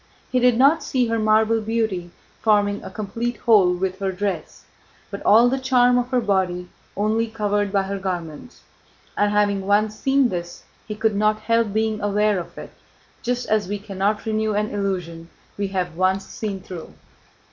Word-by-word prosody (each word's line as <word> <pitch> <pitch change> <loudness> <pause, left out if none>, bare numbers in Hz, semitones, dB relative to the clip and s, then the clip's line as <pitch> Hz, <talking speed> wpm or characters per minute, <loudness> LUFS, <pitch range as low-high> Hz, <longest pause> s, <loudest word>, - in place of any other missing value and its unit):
He 255 - +2
did 245 -1 +4
not 280 +6 +5
see 255 -2 +1
her 230 0 0
marble 220 +1 +3
beauty 220 -5 -2 0.3
forming 205 -2 +2
a - - -7
complete 230 +3 -4
whole 205 -6 +4
with 185 +1 -3
her 195 -1 -1
dress, 185 -4 -4 0.5
but 200 - -6
all 230 +4 +6
the 265 +2 0
charm 250 -2 +3
of 245 0 -3
her 255 -1 +2
body 185 -5 -1 0.3
only 220 +3 +1
covered 205 -2 -1
by 195 -1 +2
her 195 +1 -4
garments. 180 - -6 0.5
And 205 0 +2
having 205 -1 +2
once 210 +1 +2
seen 270 +1 +2
this 175 -2 -6 0.2
he 210 - -4
could 215 0 0
not 215 +1 +1
help 230 -1 +1
being 220 0 -1
aware 205 -1 +1
of 170 0 -9
it, - - -9 0.5
just 245 +1 -2
as 215 -3 +1
we 205 +2 -2
cannot 200 +1 -2
renew 215 -1 0
an 210 +1 -1
illusion 180 -5 -3 0.3
we 200 -1 -2
have 180 -3 -3
once 190 +2 +1
seen 200 -3 -5
through. 180 -3 -9
210 Hz, 175 wpm, -22 LUFS, 190-225 Hz, 0.5 s, all